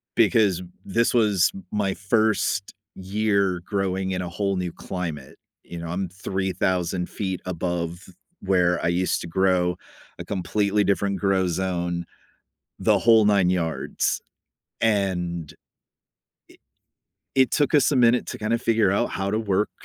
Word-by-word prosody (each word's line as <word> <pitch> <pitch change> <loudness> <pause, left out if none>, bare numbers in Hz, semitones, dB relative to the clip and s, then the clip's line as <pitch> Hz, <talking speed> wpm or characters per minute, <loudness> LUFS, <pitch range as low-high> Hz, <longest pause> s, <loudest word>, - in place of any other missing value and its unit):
because 105 -5 +3 0.2
this 115 +4 +1
was 105 -7 +3
m 95 - -9
my 100 -2 0
1st 110 +1 0 0.2
year 100 -2 0
growing 95 -1 -1
in 90 - -2
a 90 - -4
whole 100 +2 -1
new 90 -1 -2
climate. 80 -9 -6 0.3
You 85 - -8
know, 85 - -6
I'm 90 +2 -3
3,000 95 -1 -2
feet 95 -3 -4
above 85 0 -3 0.3
where 90 -3 +2
I - - +1
used 90 +1 0
to - - -6
grow. 90 0 +1 0.4
A - - -6
completely 100 +2 0
different 100 0 0
grow 95 -2 +2
zone, 85 -1 -2 0.7
the - - +3
whole 115 -2 +5
9 100 -4 +4
yards. 85 -3 -1 0.6
And 90 -7 0
i - - -26 1.8
it 130 -2 +3
took 145 -2 +2
us 145 0 +4
a - - +2
minute 120 0 +4
to - - -6
kinda 110 +2 0
figure 115 -4 +2
out 110 +4 0
how 95 0 -2
to 105 - 0
work 105 -1 0
95 Hz, 140 wpm, -24 LUFS, 90-105 Hz, 1.8 s, whole